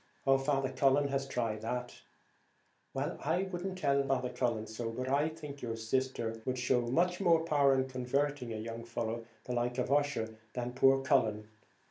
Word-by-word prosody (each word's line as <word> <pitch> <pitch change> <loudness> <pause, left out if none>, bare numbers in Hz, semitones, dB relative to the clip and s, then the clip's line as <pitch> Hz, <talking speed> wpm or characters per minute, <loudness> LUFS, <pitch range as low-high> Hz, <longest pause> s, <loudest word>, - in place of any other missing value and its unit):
"Oh, 135 -1 +5
Father 135 -1 0
Cullen 135 +2 +3
has 135 0 -1
tried 115 -5 -2
that." 125 +2 -4 0.9
"Well, 140 +5 -3
I 165 +6 +1
wouldn't 190 0 -4
tell 140 -5 +2
him 125 -4 0
so, 115 +1 -4
but 125 +3 -4
I 145 +4 +2
think 150 -3 -9
your 115 -2 -3
sister 115 -1 -1
would 130 +1 -2
show 125 0 +2
more 170 +6 +2
power 145 -4 +4
in 130 0 +1
converting 130 0 -1
a 110 - -3
young 115 +1 -5
fellow 115 0 -3 0.2
like 120 0 -1
Ussher 130 -4 0
than 125 0 -3
poor 135 +1 +4
Cullen. 110 -5 +2
130 Hz, 155 wpm, -33 LUFS, 120-140 Hz, 0.9 s, Oh